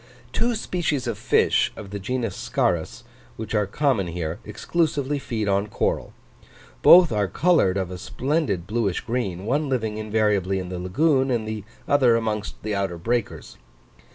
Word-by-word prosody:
Two 240 Hz, 0 st, +1 dB
species 165 Hz, -, -1 dB
of 120 Hz, -2 st, -2 dB
fish, -, -, +2 dB
of 100 Hz, -2 st, -9 dB
the 100 Hz, -, -4 dB
genus 115 Hz, 0 st, -2 dB
Scarus, 85 Hz, +7 st, -1 dB, 0.3 s
which 110 Hz, 0 st, -6 dB
are 105 Hz, -2 st, +1 dB
common 130 Hz, -5 st, +1 dB
here, 85 Hz, -1 st, -4 dB
exclusively 145 Hz, -4 st, -1 dB
feed 110 Hz, -5 st, -3 dB
on 100 Hz, +1 st, +1 dB
coral: -, -, -1 dB, 0.7 s
both 175 Hz, -, +8 dB
are 105 Hz, -2 st, +1 dB
coloured 100 Hz, -, +2 dB
of 95 Hz, -2 st, -2 dB
a 90 Hz, -, -6 dB
splendid 130 Hz, -, -1 dB
bluish 105 Hz, -3 st, -1 dB
green, 105 Hz, -7 st, -3 dB
one 140 Hz, +5 st, 0 dB
living 110 Hz, -5 st, -1 dB
invariably 105 Hz, -3 st, +1 dB
in 90 Hz, -1 st, -4 dB
the 90 Hz, -1 st, -5 dB
lagoon, 135 Hz, -, +2 dB
and 115 Hz, -3 st, -1 dB
the 110 Hz, -2 st, -4 dB, 0.2 s
other 130 Hz, -5 st, +4 dB
amongst 110 Hz, -2 st, -3 dB
the 110 Hz, 0 st, -2 dB
outer 100 Hz, -3 st, -1 dB
breakers. 115 Hz, -, -3 dB
110 Hz, 155 wpm, -24 LUFS, 95-130 Hz, 0.7 s, both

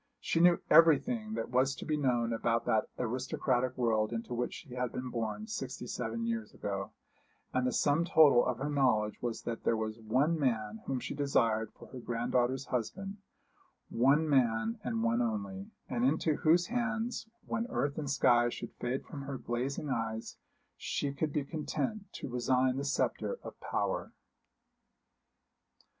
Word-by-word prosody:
She -, -, 0 dB
knew 175 Hz, 0 st, +6 dB
everything 215 Hz, -, +5 dB
that -, -, -3 dB
was 130 Hz, +2 st, +2 dB
to -, -, -8 dB
be 155 Hz, -, 0 dB
known 120 Hz, -5 st, +1 dB
about 115 Hz, +1 st, 0 dB
that 110 Hz, -, +2 dB
aristocratic 125 Hz, +1 st, -1 dB
world 110 Hz, -3 st, +1 dB
into 115 Hz, +1 st, -4 dB
which 120 Hz, 0 st, -2 dB
she 135 Hz, -6 st, -10 dB
had 125 Hz, -1 st, -2 dB
been 125 Hz, 0 st, -5 dB
born 115 Hz, -, -3 dB
sixty 135 Hz, -, -5 dB
seven 115 Hz, -1 st, -3 dB
years 115 Hz, -2 st, -3 dB
ago; 100 Hz, -1 st, -3 dB, 0.6 s
and 130 Hz, 0 st, +1 dB
the -, -, +1 dB
sum 145 Hz, +3 st, +2 dB
total 145 Hz, -8 st, +6 dB
of -, -, -1 dB
her 145 Hz, +2 st, -2 dB
knowledge 125 Hz, -7 st, +2 dB
was 120 Hz, -2 st, -3 dB
that 115 Hz, -1 st, -4 dB
there 115 Hz, -, +2 dB
was 110 Hz, 0 st, -3 dB
one 135 Hz, +9 st, +1 dB
man 110 Hz, -5 st, -1 dB
whom 135 Hz, -2 st, -1 dB
she -, -, -5 dB
desired 115 Hz, -6 st, +1 dB
for -, -, -12 dB
her 130 Hz, -, -8 dB
granddaughter's 125 Hz, +2 st, 0 dB
husband 195 Hz, -, -3 dB, 0.7 s
one 140 Hz, +7 st, +3 dB
man, 135 Hz, -, +2 dB
and 225 Hz, -1 st, -1 dB
one 230 Hz, +1 st, +2 dB
only, 210 Hz, -4 st, -3 dB, 0.2 s
and 240 Hz, -, -1 dB
into 160 Hz, -, +2 dB
whose 170 Hz, +3 st, +4 dB
hands, 235 Hz, +1 st, -2 dB, 0.2 s
when 230 Hz, +2 st, -2 dB
earth 145 Hz, -, -1 dB
and 145 Hz, -2 st, -3 dB
sky 120 Hz, -3 st, +4 dB
should -, -, -6 dB
fade 125 Hz, +2 st, -2 dB
from 145 Hz, -, -7 dB
her 135 Hz, 0 st, -5 dB
glazing 130 Hz, +4 st, -3 dB
eyes, 115 Hz, -2 st, -3 dB, 0.4 s
she 140 Hz, -1 st, -2 dB
could 150 Hz, +2 st, -1 dB
be 145 Hz, -1 st, -1 dB
content 195 Hz, +7 st, -3 dB
to -, -, -6 dB
resign 125 Hz, +1 st, +1 dB
the 140 Hz, -, -2 dB
sceptre 310 Hz, -, 0 dB
of -, -, -7 dB
power. -, -, -2 dB
130 Hz, 165 wpm, -32 LUFS, 120-160 Hz, 0.7 s, knew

